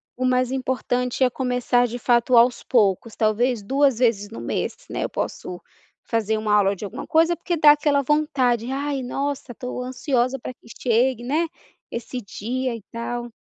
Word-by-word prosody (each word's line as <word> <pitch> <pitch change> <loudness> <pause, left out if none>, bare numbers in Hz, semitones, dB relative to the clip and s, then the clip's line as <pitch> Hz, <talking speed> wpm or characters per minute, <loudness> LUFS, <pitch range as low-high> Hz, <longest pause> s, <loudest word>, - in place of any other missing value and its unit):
o 255 - -2
mais 255 0 +2
importante 255 -1 -1
é 255 - +4
começar 245 -1 +1
de 240 +1 -5
fato 240 0 +3
aos 240 +1 +4
poucos, 220 -2 +1
talvez 225 +2 +1
2 270 +1 +2
vezes 220 -5 +1
no 225 - -8
mês, - - -2
né, - - -3
eu - - -2
posso 180 -1 -5 0.4
fazer 220 -1 0
uma 215 -1 0
aula 200 -1 +3
de 200 - -7
alguma 200 - -7
coisa, 330 +2 +3
porque 345 0 -2
dá 300 -1 +8
aquela 295 -1 +2
vontade: 260 -5 +1
"Ai 280 0 -2
nossa 275 +1 -3
estou 250 +1 -5
ansiosa 255 0 0
para 255 - -7
que 235 - -23
chegue, 240 0 +2
né, 305 +7 0 0.4
esse 245 +2 -5
dia 240 +4 -3
e 230 - -9
tal". 240 +1 -4
250 Hz, 175 wpm, -23 LUFS, 230-265 Hz, 0.4 s, dá